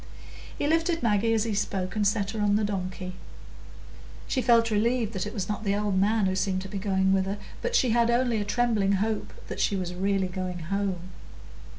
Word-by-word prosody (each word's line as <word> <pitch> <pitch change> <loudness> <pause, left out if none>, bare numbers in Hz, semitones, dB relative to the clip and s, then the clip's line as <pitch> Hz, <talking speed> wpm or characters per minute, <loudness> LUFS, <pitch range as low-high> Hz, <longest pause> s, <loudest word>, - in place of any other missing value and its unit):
He - - -1
lifted 330 +1 +1
Maggie 225 0 +2
as 220 - +2
he 225 -2 -2
spoke, 190 -2 -2
and 210 -1 +2
set 200 -1 0
her 220 -1 -3
on 205 -1 +3
the 215 - +2
donkey. 185 -2 -3 1.1
She 260 - 0
felt 230 -2 +4
relieved 225 +1 +1
that 190 0 -2
it 210 - -6
was 190 -4 -2
not 210 +1 -3
the 200 -1 +1
old 205 -1 0
man 210 +1 +2
who 190 0 +1
seemed 190 -1 0
to - - -7
be 195 +1 -5
going 190 -1 +2
with 190 -1 +2
her, 200 +2 -2 0.2
but 485 0 -1
she 255 - +3
had 235 0 +3
only 235 -2 +2
a - - 0
trembling 210 -2 +1
hope 215 +2 -1 0.2
that - - -6
she 200 - +2
was 180 -2 -3
really 195 +1 0
going 180 -1 -4
home. 185 +1 -3
205 Hz, 215 wpm, -27 LUFS, 190-225 Hz, 1.1 s, felt